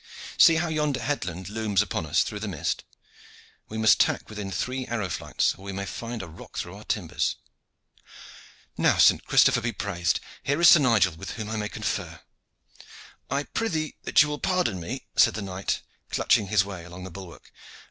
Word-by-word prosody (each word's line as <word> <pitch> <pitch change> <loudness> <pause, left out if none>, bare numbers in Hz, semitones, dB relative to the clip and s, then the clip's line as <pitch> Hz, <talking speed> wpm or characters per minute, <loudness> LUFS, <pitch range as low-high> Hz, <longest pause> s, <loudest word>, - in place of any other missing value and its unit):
See 165 - +7
how 165 +1 0
yonder 150 -4 0
headland 95 -11 -3
looms 105 -1 +1
upon 85 -5 -4
us - - +3
through 105 - -5
the 110 - -4
mist! 85 -8 -2 0.9
We 110 - -5
must 110 0 +5
tack - - +1
within 105 -2 -5
three 125 +7 -3
arrow 110 -5 -2
flights, - - 0
or 95 - -16
we 100 - -5
may 100 +1 -4
find 115 +2 -5
a - - -8
rock 80 +1 -12
through - - -4
our - - -11
timbers. - - -1 1.4
Now, - - +3
St. - - +5
Christopher - - +4
be 120 - -1
praised! 90 -5 -1 0.2
here 140 +3 0
is 170 - +8
Sir 170 - +8
Nigel, 115 - +3
with 80 - -7
whom 110 -2 -6
I - - -2
may 105 -1 -2
confer." - - -4 1.1
"I 140 +2 0
prythee 160 -6 -2
that - - +5
you 150 - -3
will 150 0 -4
pardon 180 - 0
me," 85 - -6
said - - +5
the 110 - -4
knight, 95 0 -3 0.3
clutching 105 - +2
his 100 -1 +3
way 95 -4 -7
along 90 +1 -10
the 95 - -8
bulwark. 90 -1 -11
105 Hz, 190 wpm, -26 LUFS, 95-130 Hz, 1.4 s, is